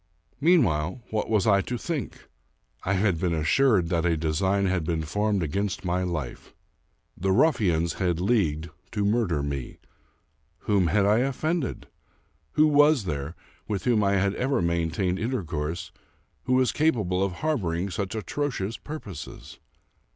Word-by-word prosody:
Meanwhile, 120 - +2
what 110 -1 -1
was 105 -4 +2
I 100 -2 +4
to 120 +4 -4
think? 150 - -5 0.6
I 100 - 0
had 95 -3 +1
been 85 -1 0
assured 90 - +3
that 85 -2 +1
a 85 -2 +2
design 95 +6 +1
had 95 -3 0
been 80 -1 -1
formed 105 +4 0
against 95 +5 -2
my 90 +1 0
life. 85 -9 -5 0.6
The 95 +2 -1
ruffians 95 - +2
had 90 -3 0
leagued 85 -6 0 0.2
to 105 -1 0
murder 100 -9 +1
me. 70 -3 -4 0.8
Whom 100 -4 +2
had 100 +4 +2
I 105 +3 +4
offended? 135 +3 -1 0.7
Who 155 - +5
was 145 -3 +5
there, 75 -2 -4 0.3
with 100 -3 -2
whom 115 -4 +2
I 100 0 +2
had 100 0 +2
ever 135 0 +1
maintained 85 +2 0
intercourse, 85 - -3 0.5
who 130 - +1
was 130 -1 +3
capable 105 - +1
of 100 -2 -1
harboring 95 - -1
such 100 +2 -3
atrocious 115 -2 -3
purposes 130 - -9
95 Hz, 145 wpm, -26 LUFS, 85-120 Hz, 0.8 s, Who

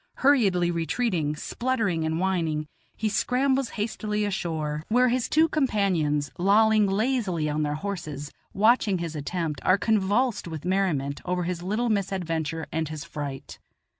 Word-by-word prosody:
Hurriedly 195 -11 +4
retreating, 165 -2 -1
spluttering 210 -3 -1
and 160 +1 -1
whining, 165 -5 0 0.3
he 220 - -1
scrambles 260 +5 +1
hastily 210 -1 -1
ashore, 160 -6 -2
where 250 +3 +4
his 250 0 0
two 315 +2 +4
companions, 185 - +1
lolling 210 +2 +4
lazily 200 -6 0
on 150 +1 -1
their 150 0 -1
horses, 155 -6 -5 0.2
watching 215 -1 +3
his 170 -2 -4
attempt, 150 0 -3
are 185 - +4
convulsed 215 +2 +1
with 160 -1 -6
merriment 175 -8 0
over 180 0 -1
his 175 0 -3
little 215 +6 -1
misadventure 165 -6 -1
and 160 -1 -2
his 155 -2 -6
fright. 140 -2 -7
185 Hz, 135 wpm, -26 LUFS, 160-215 Hz, 0.3 s, Hurriedly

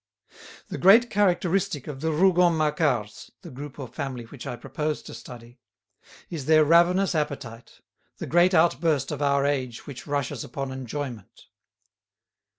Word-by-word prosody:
The - - -5
great 225 +5 +6
characteristic 185 - +1
of 140 -3 -7
the 160 0 0
Rougon 175 0 +3
Macquarts, 150 -8 -1
the - - -10
group 140 +2 -9
or 135 -3 -6
family 130 -1 -5
which 120 +2 -10
I - - -4
propose 150 +5 -4
to - - -10
study, 120 -1 -12 0.7
is 155 -6 -6
their 155 -1 +5
ravenous 175 +5 +4
appetite, 135 -7 -5 0.4
the - - -5
great 175 +2 +3
outburst 160 -3 +2
of 150 -1 -4
our 140 -1 +2
age 130 -5 -2
which 140 -1 -9
rushes 140 -3 -2
upon 135 +2 -5
enjoyment. 130 -3 -7
145 Hz, 145 wpm, -25 LUFS, 130-170 Hz, 0.7 s, great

